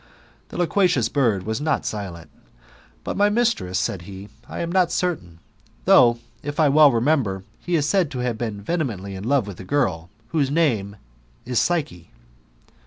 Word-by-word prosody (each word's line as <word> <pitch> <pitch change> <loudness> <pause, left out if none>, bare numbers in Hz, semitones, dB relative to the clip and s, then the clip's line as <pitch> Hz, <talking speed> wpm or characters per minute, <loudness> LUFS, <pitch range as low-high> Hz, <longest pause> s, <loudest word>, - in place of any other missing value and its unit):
'^ - - -38
The - - -8
loquacious 180 +1 +2
bird 115 -10 +1
was 110 +5 -3
not 155 0 0
silent: 95 -6 -6 0.7
"But - - -4
my 205 +1 +3
mistress," 210 - 0
said 90 0 -1
he, 95 +3 -10
" - - -27
I - - -5
am 170 0 -3
not 180 -2 +2
certain, 145 - -2 0.5
though, 120 -1 +6 0.2
if 145 +2 -5
I 155 -2 +5
well 150 +1 +7
remem 135 +6 +2
ber, 95 -4 -4 0.2
he 175 - -2
is 150 -3 +1
said 185 -3 +2
to 130 - -6
have 120 -2 -1
been 110 -3 -4
vehemently 110 - -3
in 95 0 -7
love 135 0 +2
with, 100 -4 -9
a - - -7
girl, 90 - -1 0.2
whose 145 -3 +1
name 120 -11 +1 0.5
is 125 -1 0
Psyche." 140 - -1
125 Hz, 180 wpm, -23 LUFS, 100-160 Hz, 0.7 s, well